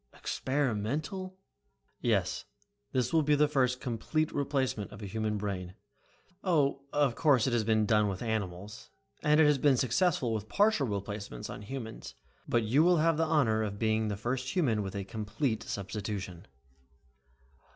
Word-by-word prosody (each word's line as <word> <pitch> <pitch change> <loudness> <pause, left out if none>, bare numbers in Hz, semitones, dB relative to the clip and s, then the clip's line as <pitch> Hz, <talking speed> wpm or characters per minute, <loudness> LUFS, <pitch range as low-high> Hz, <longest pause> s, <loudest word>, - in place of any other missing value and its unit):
"Experimental!" 145 - -2 0.6
"Yes, - - 0 0.5
this 125 0 0
will 160 - +5
be 150 0 +3
the 150 +1 +4
first 130 -3 +1
complete 135 +6 -1
replacement 135 -7 -1
of - - -10
a - - -4
human 110 +1 -2
brain. 95 -3 -4 0.7
Oh, 145 -7 +2
of 145 -4 +2
course 130 -2 +3
it 130 - 0
has 120 -2 +2
been 110 0 +2
done 105 0 +3
with 95 +1 -3
animals, 105 -1 -4 0.3
and 150 0 +4
it 160 - +7
has 150 -2 +4
been 140 -2 +4
successful 130 - +1
with 110 -1 -4
partial 205 -9 +3
replacements 100 - -5
on - - -7
humans. 115 0 -7 0.3
But 120 -1 +2
you 120 +8 +3
will 175 0 +5
have 165 0 +3
the 165 - +2
honor 120 -9 +3
of 100 -2 -3
being 110 0 +1
the 105 -2 -2
first 125 +4 -3
human 125 - +2
with 95 0 -5
a 100 - -2
complete 110 +4 -2
substitution." 100 -3 -5
115 Hz, 160 wpm, -30 LUFS, 105-145 Hz, 0.7 s, it